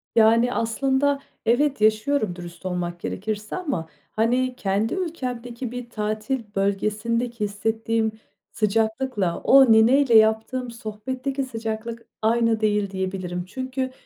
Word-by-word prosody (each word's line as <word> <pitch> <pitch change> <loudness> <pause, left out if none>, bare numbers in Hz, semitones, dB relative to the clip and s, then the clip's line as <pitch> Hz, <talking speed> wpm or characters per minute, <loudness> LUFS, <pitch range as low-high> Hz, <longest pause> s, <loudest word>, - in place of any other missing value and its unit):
Yani, 230 +2 +5
aslında 270 +5 +1 0.3
evet, 265 +1 +2
yaşıyorum 215 -2 +2
dürüst 175 +1 -10
olmak 175 -1 -3
gerekirse 210 +3 -4
ama, 280 - -3 0.2
hani, 250 +3 +1
kendi 200 +2 0
ülkemdeki 250 -9 -4
bir 245 -1 -6
tatil 215 +4 -2
bölgesindeki 215 +4 -1
hissettiğim 220 +2 0 0.4
sıcaklıkla, 220 -2 0
o 265 -3 +7
nineyle 235 +3 +5
yaptığım 220 +3 +2
sohbetteki 255 +5 -4
sıcaklık 230 -1 -5
aynı 230 0 +2
değil 210 -2 +1
diyebilirim. 185 -2 -3
Çünkü 260 +4 -4
225 Hz, 105 wpm, -24 LUFS, 210-255 Hz, 0.4 s, o